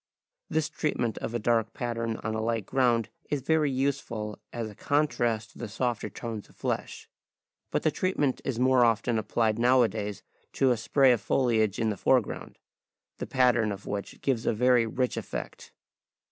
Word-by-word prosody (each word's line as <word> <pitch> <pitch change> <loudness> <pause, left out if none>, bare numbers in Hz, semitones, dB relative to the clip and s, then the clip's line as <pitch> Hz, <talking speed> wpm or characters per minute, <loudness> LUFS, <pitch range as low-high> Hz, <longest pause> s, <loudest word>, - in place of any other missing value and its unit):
This 160 -2 +1
treatment 120 -7 -2
of 120 - -4
a - - +3
dark 115 -1 +1
pattern 115 -2 -2
on 110 - -2
a 110 - -1
light 115 -2 -1
ground 120 -3 +2 0.2
is 145 -2 -1
very 155 +2 +2
useful 130 -6 -2
as 115 -2 -4
a 105 - -9
contrast 120 -4 0
to - - -17
the 120 - -4
softer 115 -1 -2
tones 110 0 -6
of - - -21
flesh. - - -4 0.6
But - - -1
the - - +3
treatment 150 -8 0
is 130 -4 -2
more 130 -1 +5
often 115 0 +2
applied 110 +1 0
nowadays 115 -5 +2 0.3
to 135 -1 +3
a - - +3
spray 130 +4 +4
of 120 -3 +2
foliage 110 -7 +1
in 110 -2 +1
the 100 - -4
foreground, - - 0 0.6
the - - -4
pattern 120 -4 +3
of 100 0 -7
which 100 0 -5
gives 125 -5 0
a - - +3
very 125 +1 +3
rich 125 +2 -1
effect. - - -6
120 Hz, 175 wpm, -28 LUFS, 110-130 Hz, 0.6 s, more